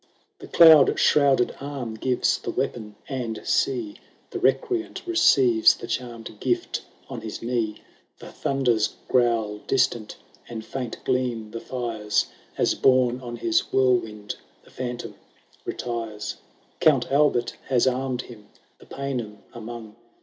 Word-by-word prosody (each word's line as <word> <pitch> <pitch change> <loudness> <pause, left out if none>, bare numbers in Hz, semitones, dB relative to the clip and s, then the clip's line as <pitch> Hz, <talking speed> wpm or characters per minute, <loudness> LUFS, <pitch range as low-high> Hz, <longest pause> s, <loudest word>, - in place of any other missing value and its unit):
The - - -10
cloud 160 -4 +7
shrouded 140 -4 +3
arm 135 -5 -5
gives 125 +3 0
the - - -6
weapon; 105 -3 -3
and 120 -5 -4
see! 355 -5 0 0.3
The - - -4
recreant 370 -8 0
receives 130 - +5
the - - -8
charmed 115 -3 -5
gift 125 -2 -1 0.3
on 120 -4 -7
his 110 0 -7
knee: 115 -3 -2 0.3
The - - -11
thunders 125 -6 0
growl 115 -4 +1
distant, 120 -4 +1 0.3
and 110 -2 -6
faint 125 -4 -5
gleam 120 -4 -1
the 115 - -5
fires, 115 -4 -1 0.3
As, - - +2
borne 130 -1 +3
on 120 -1 -6
his 340 - 0
whirlwind, 120 -5 +1 0.3
the - - -20
Phantom 125 -1 -5 0.5
retires. 115 -3 -4 0.4
Count 135 -6 +3
Albert 140 -4 +2
has 125 -3 +3
armed 130 -1 -1
him 105 -4 -13 0.3
the - - -17
Paynim 120 -7 -5
among. 115 -2 -8
120 Hz, 130 wpm, -25 LUFS, 115-135 Hz, 0.5 s, cloud